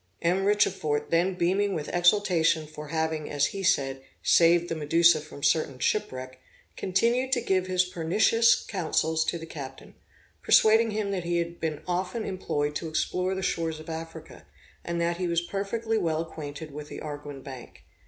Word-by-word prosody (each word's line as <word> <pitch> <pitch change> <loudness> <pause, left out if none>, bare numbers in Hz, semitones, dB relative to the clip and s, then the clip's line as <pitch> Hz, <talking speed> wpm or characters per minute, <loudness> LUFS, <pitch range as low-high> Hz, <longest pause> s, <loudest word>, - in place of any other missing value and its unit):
M. 185 +3 +2
Richefort, 175 -7 +1
then 175 +3 +2
beaming 195 +3 +1
with 150 - -4
exultation 175 -3 +3
for 150 0 -9
having, 160 0 -2
as 145 -1 +1
he 195 - -4
said, 135 -7 +1 0.2
saved 170 0 +5
the - - -2
Medusa 165 +1 +4
from 150 -2 -12
certain 145 -5 +1
shipwreck, 130 - -2 0.4
continued 235 +7 +1
to 250 - +3
give 190 -5 0
his 185 0 +2
pernicious 210 +7 +3
counsels 160 -4 0
to - - -1
the 165 - -8
captain, 135 -4 -9 0.5
persuading 225 +1 +5
him 210 -2 -2
he 175 -2 -1
had 170 0 -3
been 155 -2 -3
often 185 +5 -2
employed 150 -6 -2
to 165 - -6
explore 180 +4 -1
the 190 - -4
shores 165 -3 -1
of 155 +1 -8
Africa, 160 0 -9 0.4
and 170 0 -3
that 170 0 0
he 180 0 -1
was 170 0 +1
perfectly 220 +5 -2
well 160 -4 0
acquainted 155 -2 -7
with 150 +1 -8
the - - -7
Arguin 145 -2 -7
Bank. 130 -3 -11
170 Hz, 165 wpm, -27 LUFS, 155-190 Hz, 0.5 s, saved